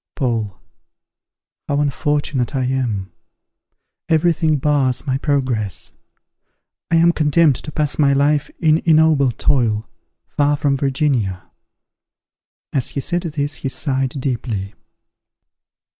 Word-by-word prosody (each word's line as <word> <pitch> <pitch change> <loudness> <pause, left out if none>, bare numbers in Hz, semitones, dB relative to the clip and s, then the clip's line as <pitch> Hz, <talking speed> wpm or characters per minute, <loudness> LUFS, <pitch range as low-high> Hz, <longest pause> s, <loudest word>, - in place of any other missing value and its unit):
Paul. 115 -8 -2 1.1
How 145 - 0
unfortunate 145 -2 -1
I 130 - 0
am! 120 -7 -2 1.0
Every 165 +1 +3
thing 155 -1 +1
bars 140 -2 0
my 135 -1 -1
progress. 130 - -2 1.0
I 170 - +2
am 170 +1 +5
condemned 155 -3 +3
to 150 - -7
pass 150 0 -1
my 140 -2 +4
life 145 +1 +2
in 160 -1 +3
ignoble 155 -4 +4
toil, 115 -3 0 0.4
far 145 0 0
from 145 -1 +1
Virginia. 130 - -1 1.2
As 135 -3 +1
he - - -4
said 175 +5 -1
this 150 -4 -3
he 135 - -4
sighed 135 -1 -1
deeply. 115 -7 -3
140 Hz, 115 wpm, -19 LUFS, 130-150 Hz, 1.2 s, am